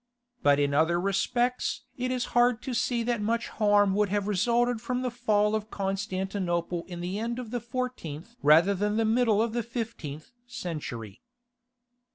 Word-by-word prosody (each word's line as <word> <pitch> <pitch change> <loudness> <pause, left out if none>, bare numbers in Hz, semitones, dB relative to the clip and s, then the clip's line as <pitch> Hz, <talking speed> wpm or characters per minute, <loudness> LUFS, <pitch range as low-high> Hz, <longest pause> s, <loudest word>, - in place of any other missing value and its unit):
But 145 0 +4
in 140 0 +1
other 160 +4 +3
respects 240 +6 0
it 255 0 -2
is 255 -1 -1
hard 240 0 +3
to 260 - -3
see 235 0 0
that 235 -2 -1
much 230 +2 -1
harm 205 -2 +3
would 205 0 +2
have 205 0 0
resulted 235 +4 +1
from 250 +2 -2
the 250 - -1
fall 215 -3 +1
of 215 0 -2
Constantinople 190 -3 -2
in 175 -2 -7
the 185 +4 -3
end 235 +2 -2
of 245 -3 -6
the 245 -1 -2
fourteenth 235 - -5
rather 165 +7 +6
than 210 +2 0
the 225 - +2
middle 220 -1 +3
of 230 -1 -2
the 240 - 0
fifteenth 225 - -6 0.2
century. 150 - -6
210 Hz, 170 wpm, -28 LUFS, 180-240 Hz, 0.2 s, rather